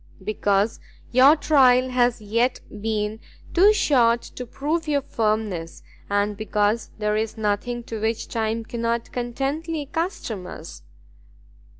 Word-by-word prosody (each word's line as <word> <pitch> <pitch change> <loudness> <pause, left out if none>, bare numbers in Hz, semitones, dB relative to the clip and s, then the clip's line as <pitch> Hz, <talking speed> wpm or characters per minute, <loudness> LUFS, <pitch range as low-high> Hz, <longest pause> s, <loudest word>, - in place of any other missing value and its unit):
"Because 205 +1 0 0.3
your 265 +5 +7
trial 260 -5 +4
has 245 -1 +2
yet 230 +5 +1 0.2
been 215 0 -2 0.3
too 390 +4 +6
short 245 - +3
to 250 - -8
prove 310 +6 -2
your 285 -2 +1
firmness, 210 -8 -2 0.3
and 205 +1 +1
because 210 +1 0
there 210 0 0
is 220 +1 -2
nothing 220 +3 -1
to 225 -2 -6
which 225 +1 -1
time 225 0 -2
cannot 230 0 -2
contentedly 275 +6 -3
accustom 280 - -4
us." 155 - -9
230 Hz, 120 wpm, -23 LUFS, 215-260 Hz, 0.3 s, your